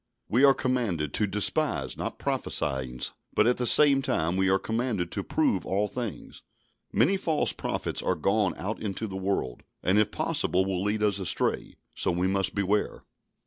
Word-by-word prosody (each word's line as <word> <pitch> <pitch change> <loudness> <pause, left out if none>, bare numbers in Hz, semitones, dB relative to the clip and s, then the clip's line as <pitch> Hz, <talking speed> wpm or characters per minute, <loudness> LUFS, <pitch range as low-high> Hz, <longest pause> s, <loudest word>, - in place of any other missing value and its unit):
We 125 +5 +2
are 135 -1 +7
commanded 105 - -1
to 105 - +1
"despise 105 +10 0
not - - -4
prophesyings," 65 -2 -2 0.2
but 105 - +4
at 120 +1 +2
the 125 - -1
same 140 0 +6
time 85 -8 0
we 95 0 +2
are 95 - +4
commanded 110 -5 -2
to - - -3
"prove - - 0
all 100 +2 0
things." 120 -2 -6 0.5
"Many 195 - +3
false 165 -5 0
prophets - - -3
are - - 0
gone 100 +3 +1
out 100 +6 -4
into 105 +1 -3
the 95 -3 -6
world," 95 -10 -2 0.2
and, 95 +3 +3
if 105 - +2
possible, 95 +1 0
will 95 -2 -2
lead 105 +1 0
us 100 -2 +2
astray. 95 - -1 0.2
So - - 0
we 90 +1 0
must 95 0 0
beware. 100 +1 -1
100 Hz, 175 wpm, -27 LUFS, 95-115 Hz, 0.5 s, are